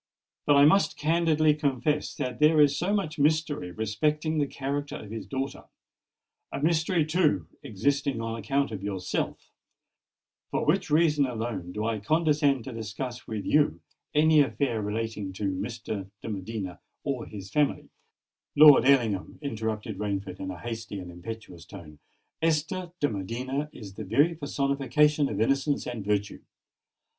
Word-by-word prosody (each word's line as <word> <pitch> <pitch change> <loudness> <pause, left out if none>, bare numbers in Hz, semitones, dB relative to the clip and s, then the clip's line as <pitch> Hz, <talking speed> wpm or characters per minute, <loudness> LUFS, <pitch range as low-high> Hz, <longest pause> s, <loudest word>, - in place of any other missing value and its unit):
But 145 - +6
I 140 - +8
must 195 +7 +4
candidly 155 -1 +3
confess 145 0 -1
that 125 -1 -4
there 155 +1 +5
is 145 -1 +5
so 180 +7 -1
much 185 -8 -1
mystery 150 - +1
respecting 150 - -1
the 145 - +1
character 140 +1 -3
of 105 - -9
his 115 - -6
daughter—a 135 +1 -8
mystery, 160 0 +2
too, 155 - +2 0.2
existing 135 +4 -1
on 115 0 -3
account 135 +5 0
of 105 -3 -5
yourself, 95 -2 -3 1.0
for - - -1
which 180 +3 +2
reason 150 -2 +3
alone 110 -7 -4
do 105 +3 -3
I 115 -1 -1
condescend 150 0 +2
to 130 - -7
discuss 115 +3 -6
with 110 -2 -4
you 150 0 +3 0.4
any 155 +1 +5
affair 135 -5 0
relating 105 -2 -3
to 100 - -6
Mr. 105 0 -5
de - - -5
Medina 100 -2 -5 0.2
or 135 -5 -3
his 100 -2 -9
family——" 150 -1 0 0.6
"Lord 150 -2 +9
Ellingham," 115 -8 +2
interrupted 110 -4 -3
Rainford 100 -3 -3
in 95 - -4
a 90 -2 -6
hasty 115 -3 -5
and 90 -2 -7
impetuous 90 -1 -9
tone, 85 -6 -12 0.4
"Esther 165 +3 0
de 145 - +4
Medina 125 +8 -3
is 100 -4 -10
the 110 - -7
very 140 - +3
personification 145 0 +1
of 105 - -3
innocence 135 +5 +1
and 115 -4 -5
virtue! 105 0 -1
130 Hz, 145 wpm, -27 LUFS, 105-150 Hz, 1.0 s, Lord